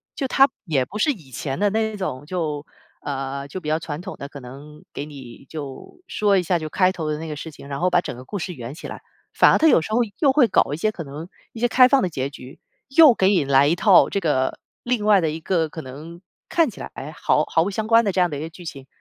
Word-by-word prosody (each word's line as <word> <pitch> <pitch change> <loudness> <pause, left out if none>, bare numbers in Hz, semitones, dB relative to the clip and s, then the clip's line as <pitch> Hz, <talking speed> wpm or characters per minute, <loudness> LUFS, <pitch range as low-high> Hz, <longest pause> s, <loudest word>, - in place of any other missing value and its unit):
就 275 - -2
它 270 +1 +5 0.2
也 140 -7 +1
不 210 - -8
是 290 +7 +2
以 165 - -10
前 135 +3 -4
的 205 - +3
那 220 +1 -1
种， 145 -9 -4
就， 155 -3 -3 0.4
呃， 140 0 -4
就 185 +5 -7
比 150 - -5
较 155 - +2
传 160 -1 -6
统 190 +1 -7
的， 140 - -7
可 140 - -10
能 140 +4 -12
给 145 - -5
你 135 -4 -12
就 145 - -9
说 205 -2 +1
一 185 - +3
下 180 0 0
就 155 -2 -5
开 185 +3 +2
头 160 -5 -4
的 150 - -3
那 160 - -6
个 150 - -5
事 160 +2 -7
情， 140 - -13
然 140 -1 -5
后 180 +1 +1
把 175 - +4
整 - - -6
个 130 - -11
故 205 - -5
事 180 +1 -4
圆 120 +1 -7
起 - - -9
来， - - -8 0.3
反 - - +6
而 - - +4
它 320 - +5
有 290 - +5
时 215 - -7
候 240 - +3 0.2
又 280 -4 +4
会 265 -3 +4
搞 145 - +2
一 - - -3
些 215 +6 0
可 175 - -7
能 150 +4 -9 0.2
一 225 - -9
些 240 - +2
开 250 +1 +6
放 275 0 +3
的 185 - 0
结 135 -3 -3
局， 135 -2 -12 0.3
又 290 -1 +7
给 190 -4 +2
你 195 -6 +3
来 140 +1 +4
一 160 - +2
套 190 +1 +5
这 200 - -1
个 140 -7 0 0.2
另 240 -4 -1
外 205 -3 +5
的 160 - 0
一 155 +2 -5
个， 165 -1 0
可 160 +1 -8
能 155 +7 -10 0.3
看 330 -7 +2
起 - - -14
来， - - -7
哎， 145 +3 -7
毫 150 - +1
毫 160 - +2
不 190 - -2
相 215 +2 -3
关 230 +1 +5
的 200 - 0
这 185 - -1
样 180 -2 +2
的 145 - -3
一 - - -6
个 160 - -5
剧 175 +1 -13
情， 135 -4 -8
165 Hz, 305 characters per minute, -22 LUFS, 145-205 Hz, 0.4 s, 又